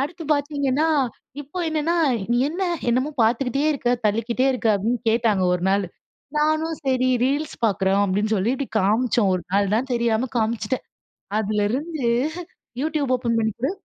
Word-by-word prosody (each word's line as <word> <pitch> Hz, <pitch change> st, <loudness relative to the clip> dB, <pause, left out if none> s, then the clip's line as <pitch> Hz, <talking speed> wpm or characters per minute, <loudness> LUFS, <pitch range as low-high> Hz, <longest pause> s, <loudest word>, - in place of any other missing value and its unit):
அடுத்து 320 Hz, +4 st, -4 dB
பாத்தீங்கன்னா 285 Hz, 0 st, 0 dB, 0.5 s
இப்ப 290 Hz, +6 st, -8 dB
என்னன்னா 315 Hz, +2 st, 0 dB, 0.3 s
நீ 240 Hz, -, +3 dB
என்ன 345 Hz, +5 st, -4 dB, 0.3 s
என்னமோ 255 Hz, +5 st, +1 dB
பாத்துக்கிட்டே 250 Hz, +5 st, +1 dB
இருக்க, 250 Hz, -4 st, -1 dB, 0.2 s
தள்ளிக்கிட்டே 230 Hz, +5 st, 0 dB
இருக்க 245 Hz, -3 st, -1 dB
அப்படின்னு 225 Hz, +5 st, 0 dB
கேட்டாங்க 220 Hz, -4 st, +2 dB
ஒரு 180 Hz, -1 st, -1 dB
நாள். 195 Hz, +1 st, +2 dB, 0.5 s
நானும் 310 Hz, +2 st, +1 dB
சரி, 255 Hz, -1 st, +2 dB, 0.2 s
ரீல்ஸ் 290 Hz, +3 st, -1 dB
பாக்குறோம். 195 Hz, -1 st, +1 dB
அப்படின்னு 205 Hz, +3 st, 0 dB
சொல்லி 200 Hz, +4 st, +1 dB
இப்படி 270 Hz, 0 st, -4 dB
காமிச்சோம் 215 Hz, +1 st, +2 dB
ஒரு 180 Hz, -, -2 dB
நாள் 200 Hz, 0 st, +2 dB
தான் 260 Hz, +4 st, -2 dB
தெரியாம 235 Hz, +1 st, +1 dB
காமிச்சுட்டேன். 225 Hz, +1 st, -1 dB, 0.5 s
அதிலிருந்து 220 Hz, +9 st, -1 dB, 0.8 s
YouTube 300 Hz, -3 st, -1 dB
ஓப்பன் 235 Hz, -2 st, -1 dB
பண்ணி 220 Hz, -1 st, +1 dB
கொடு. 265 Hz, +5 st, 0 dB
245 Hz, 145 wpm, -23 LUFS, 215-285 Hz, 0.8 s, நீ